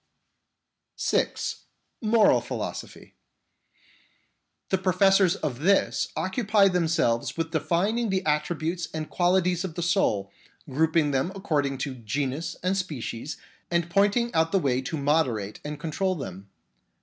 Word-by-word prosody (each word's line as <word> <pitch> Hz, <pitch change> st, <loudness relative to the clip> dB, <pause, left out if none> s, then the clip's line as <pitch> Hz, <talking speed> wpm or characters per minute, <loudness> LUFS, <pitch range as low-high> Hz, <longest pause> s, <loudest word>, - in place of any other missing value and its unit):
(6) -, -, -1 dB, 0.4 s
Moral 220 Hz, -1 st, +4 dB
Philosophy. -, -, -6 dB, 1.6 s
The 190 Hz, -, +1 dB
professors 190 Hz, 0 st, +4 dB
of 135 Hz, -5 st, -4 dB
this 195 Hz, +6 st, +2 dB
occupy 200 Hz, 0 st, +2 dB
themselves 165 Hz, -11 st, +1 dB
with 165 Hz, 0 st, -2 dB
defining 200 Hz, +8 st, 0 dB
the 190 Hz, -1 st, -1 dB
attributes 160 Hz, +2 st, -1 dB
and 155 Hz, -1 st, -4 dB
qualities 180 Hz, 0 st, +2 dB
of 175 Hz, -4 st, -5 dB
the 175 Hz, -, -2 dB
soul, 135 Hz, -, +1 dB, 0.4 s
grouping 155 Hz, +1 st, +2 dB
them 135 Hz, +6 st, 0 dB
according 145 Hz, -8 st, -1 dB
to 140 Hz, -, -5 dB
genus 135 Hz, +6 st, -3 dB
and 185 Hz, +1 st, +1 dB
species, 150 Hz, -7 st, -4 dB, 0.3 s
and 170 Hz, 0 st, 0 dB
pointing 205 Hz, +5 st, +2 dB
out 160 Hz, 0 st, +2 dB
the 195 Hz, -, +3 dB
way 130 Hz, -7 st, +1 dB
to 130 Hz, +5 st, -4 dB
moderate 140 Hz, -9 st, 0 dB
and 150 Hz, 0 st, -6 dB
control 185 Hz, +4 st, -1 dB
them. 100 Hz, -, -8 dB
165 Hz, 125 wpm, -26 LUFS, 145-190 Hz, 1.6 s, Moral